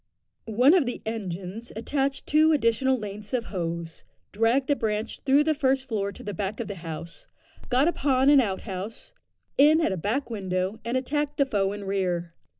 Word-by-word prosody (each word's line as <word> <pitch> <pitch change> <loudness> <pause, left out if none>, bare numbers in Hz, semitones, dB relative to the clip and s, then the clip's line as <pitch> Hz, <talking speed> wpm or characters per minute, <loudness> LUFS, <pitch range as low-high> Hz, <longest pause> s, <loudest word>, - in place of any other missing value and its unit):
One 245 +7 +5
of 340 -9 +4
the 245 - -4
engines 200 0 -5
attached 275 +4 -1
two 310 +2 +4
additional 260 -1 +2
lengths 210 +1 -7
of 235 -2 -1
hose, 170 -2 -4 0.3
dragged 230 +6 +2
the 285 - +3
branch 215 -2 -2
through 280 +1 +4
the 315 +1 +2
first 270 -2 +1
floor 200 -4 -1
to - - -12
the 205 - -4
back 200 +3 -3
of 235 - -3
the 205 - -4
house, 165 0 -8 0.4
got 255 +4 +3
upon 275 -4 +3
an 285 -2 +7
outhouse, 200 - -5 0.5
in 305 +3 +7
at 320 - +1
a 190 - -2
back 235 - -2
window, 190 0 -2
and 235 +3 -1
attacked 290 +3 -2
the 280 - +4
foe 200 -6 0
in 205 0 -6
rear. 180 -3 -1
225 Hz, 180 wpm, -26 LUFS, 195-270 Hz, 0.5 s, an